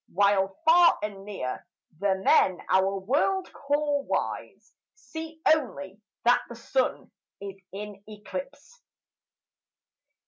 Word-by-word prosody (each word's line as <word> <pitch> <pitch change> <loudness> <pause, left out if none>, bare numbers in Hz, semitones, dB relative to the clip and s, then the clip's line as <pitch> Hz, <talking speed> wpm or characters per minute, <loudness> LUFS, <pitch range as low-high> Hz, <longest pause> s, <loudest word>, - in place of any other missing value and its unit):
While 195 0 +2
far 340 +1 +7
and 200 -2 -5
near 160 -11 -5 0.4
the 200 -1 +2
men 190 -1 +4
our 190 +1 +3
world 290 - 0
call 290 0 0
wise 465 - -4 0.2
See 320 0 -8
only 215 -10 +1 0.2
that 245 +1 +5
the 235 - -8
Sun 255 +3 -1 0.3
is 195 -1 -7
in 205 0 -8
eclipse. 485 - -8
210 Hz, 105 wpm, -27 LUFS, 195-300 Hz, 0.4 s, far